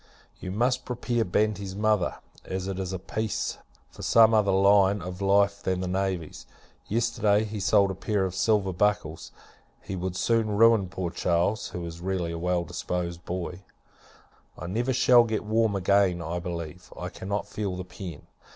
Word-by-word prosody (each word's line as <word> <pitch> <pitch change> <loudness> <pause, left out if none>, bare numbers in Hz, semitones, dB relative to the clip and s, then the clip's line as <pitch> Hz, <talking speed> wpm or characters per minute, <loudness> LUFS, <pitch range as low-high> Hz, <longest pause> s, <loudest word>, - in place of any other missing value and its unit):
You 90 - -6
must 125 +5 +1
prepare 120 -1 -1
Banti's 100 -1 -1
mother, 105 -3 +1 0.3
as 95 0 -4
it 95 -1 -3
is 95 -1 -3
a 95 - -2
peace, 110 +4 -3 0.3
for - - -12
some 115 -1 +5
other 105 -2 +3
line 100 +1 +4
of 90 +1 -7
life 100 +1 +3
than 95 -2 -1
the 90 - -2
navy. 95 -3 -2 0.6
Yesterday, 110 -2 +1
he 110 -1 -5
sold 100 0 +3
a - - -3
pair 95 +1 -1
of 95 - -3
silver 100 -1 +1
buckles; 100 -4 -1 0.5
he 95 - -6
would 90 0 -3
soon 110 0 +1
ruin 115 -4 +5
poor 90 -1 -4
Charles, 90 +4 0
who 90 -1 -6
is 85 0 -8
really 90 -2 -2
a 85 - -5
well 90 0 0
disposed 85 0 -4
boy. 90 0 -4 1.0
I 85 - -7
never 115 +8 -1
shall 125 -1 +6
get 110 -2 -2
warm 110 -1 +1
again, 95 -1 +2
I 85 +1 -3
believe. 85 -1 -7
I - - -4
cannot 100 +2 -4
feel 100 -2 -3
the 90 - -5
pen. 90 -4 -9
95 Hz, 170 wpm, -27 LUFS, 90-105 Hz, 1.0 s, shall